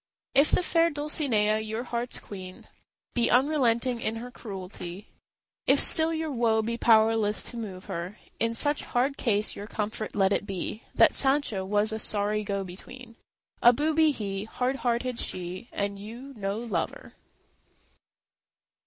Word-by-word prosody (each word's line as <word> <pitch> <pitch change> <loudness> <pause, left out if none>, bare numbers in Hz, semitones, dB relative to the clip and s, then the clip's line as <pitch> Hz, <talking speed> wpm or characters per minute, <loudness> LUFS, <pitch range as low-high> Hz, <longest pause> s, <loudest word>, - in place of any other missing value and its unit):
If 280 +2 +5
the - - +2
fair 335 -1 +3
Dulcinea, 280 -9 +1
your 220 +2 -4
heart's 240 0 -3
queen, 185 -2 -10 0.5
Be 240 -1 +1
unrelenting 250 -3 +2
in 220 - -1
her 240 +2 -7
cruelty, 190 -3 -8 0.6
If - - +5
still 320 -1 +7
your 320 -1 -2
woe 230 -3 +2
be 230 +2 -2
powerless 220 -2 +3
to 240 - -7
move 195 -4 -7
her, 180 +1 -5 0.2
In 230 0 0
such 290 +4 +3
hard 260 +3 0
case 215 -5 0
your 205 - -7
comfort 215 0 -4
let 195 -1 +3
it 205 - -2
be 195 +3 -4
That - - +5
Sancho 270 -8 +2
was 205 +3 +1
a 220 - -3
sorry 210 0 0
go 200 -1 -2
between: 230 +6 -11 0.5
A 240 - +7
booby 310 +3 +3
he, 200 -7 -3
hard 250 +4 -2
hearted 245 -1 -1
she, 185 +5 -5
and 200 0 -3
you 235 +7 -9
no 200 -1 -3
lover. 220 -8 -4
225 Hz, 150 wpm, -27 LUFS, 205-255 Hz, 0.6 s, still